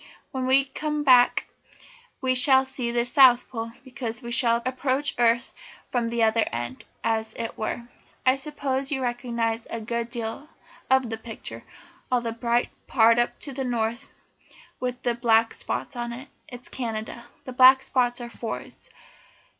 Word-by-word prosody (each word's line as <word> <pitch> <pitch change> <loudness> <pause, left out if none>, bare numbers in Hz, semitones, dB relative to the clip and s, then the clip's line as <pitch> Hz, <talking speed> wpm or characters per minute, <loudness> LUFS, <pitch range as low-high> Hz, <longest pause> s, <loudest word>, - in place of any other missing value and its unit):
When 260 -2 -2
we 270 +1 +5
come 300 +2 -3
back 250 -3 +5 0.8
we 260 -1 +2
shall 265 +1 +5
see 255 -2 -3
the 235 0 0
South 255 -1 +6
Pole, 230 -2 -5
because 240 -2 -5
we 235 - -6
shall 235 -2 +4
approach 260 +2 -1
the - - -2
earth 235 +1 +3 0.4
from 240 -2 0
the 235 0 +1
other 220 0 +3
end, 120 +2 -5 0.2
as 220 -1 -1
it 230 -1 -5
were. 220 +2 -3 0.4
"I 255 0 +5
suppose 275 -1 -3
you 265 -2 -1
recognise 235 -2 -2
a 230 - -4
good 235 +1 -3
deal 235 +5 -5 0.4
of 260 -3 +3
the 225 - -3
picture. 220 - -8 0.5
All 250 - +3
that 230 -1 -5
bright 240 0 +1 0.2
part 230 -1 +5
up 240 - 0
to 280 - -2
the 265 +1 -3
north, 235 +1 -2 0.7
with 250 0 -3
the 240 - +1
black 230 -1 +3
spots - - -4
on 240 0 -4
it, 265 +4 -9 0.2
is 245 0 -8
Canada. 230 -1 -5 0.2
The 255 - -7
black 260 +1 +7
spots 245 -2 0
are 240 - -6
forests. 230 - -7
240 Hz, 165 wpm, -25 LUFS, 230-260 Hz, 0.8 s, black